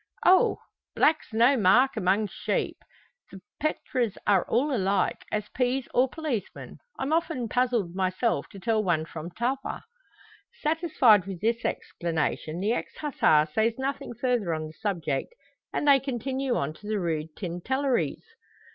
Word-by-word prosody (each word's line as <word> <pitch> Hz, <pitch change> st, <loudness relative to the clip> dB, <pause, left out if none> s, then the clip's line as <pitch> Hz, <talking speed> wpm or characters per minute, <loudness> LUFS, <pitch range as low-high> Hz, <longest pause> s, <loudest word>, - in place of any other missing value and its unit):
"Oh! 370 Hz, +1 st, +5 dB, 0.4 s
black's 310 Hz, -4 st, +2 dB
no 235 Hz, +5 st, +4 dB
mark 250 Hz, +5 st, +4 dB
among 200 Hz, +1 st, +2 dB
sheep. -, -, -2 dB, 0.5 s
The 195 Hz, -, -10 dB, 0.2 s
pretres 255 Hz, -7 st, -1 dB
are 200 Hz, -3 st, +3 dB
all 275 Hz, +4 st, +2 dB
alike, 195 Hz, -2 st, 0 dB
as 210 Hz, -1 st, -2 dB
peas 255 Hz, +1 st, -1 dB
or 255 Hz, +1 st, +3 dB
policemen. 270 Hz, -, -5 dB, 0.2 s
I'm 275 Hz, +4 st, -1 dB
often 320 Hz, -7 st, 0 dB
puzzled 240 Hz, -7 st, 0 dB
myself 190 Hz, +5 st, 0 dB
to 195 Hz, -, -11 dB
tell 220 Hz, +1 st, +1 dB
one 165 Hz, -4 st, +1 dB
from 165 Hz, 0 st, -7 dB
t'other." 245 Hz, +9 st, -3 dB, 0.8 s
Satisfied 300 Hz, -, +3 dB
with 190 Hz, -3 st, -5 dB
this 230 Hz, +4 st, 0 dB
explanation, 165 Hz, -1 st, -2 dB
the 210 Hz, +4 st, +1 dB
ex -, -, -5 dB
Hussar 160 Hz, -, +3 dB
says 225 Hz, +1 st, +2 dB
nothing 270 Hz, -2 st, -3 dB
further 235 Hz, -8 st, 0 dB
on 155 Hz, 0 st, -4 dB
the 155 Hz, -, -9 dB
subject, 170 Hz, -, -3 dB, 0.4 s
and 295 Hz, -, -1 dB
they 280 Hz, -1 st, +7 dB
continue 265 Hz, 0 st, -2 dB
on 140 Hz, +2 st, -1 dB
to 205 Hz, +6 st, -13 dB
the 215 Hz, -1 st, 0 dB
Rue 160 Hz, -3 st, -1 dB
Tintelleries. 245 Hz, +9 st, -1 dB
225 Hz, 145 wpm, -27 LUFS, 185-265 Hz, 0.8 s, they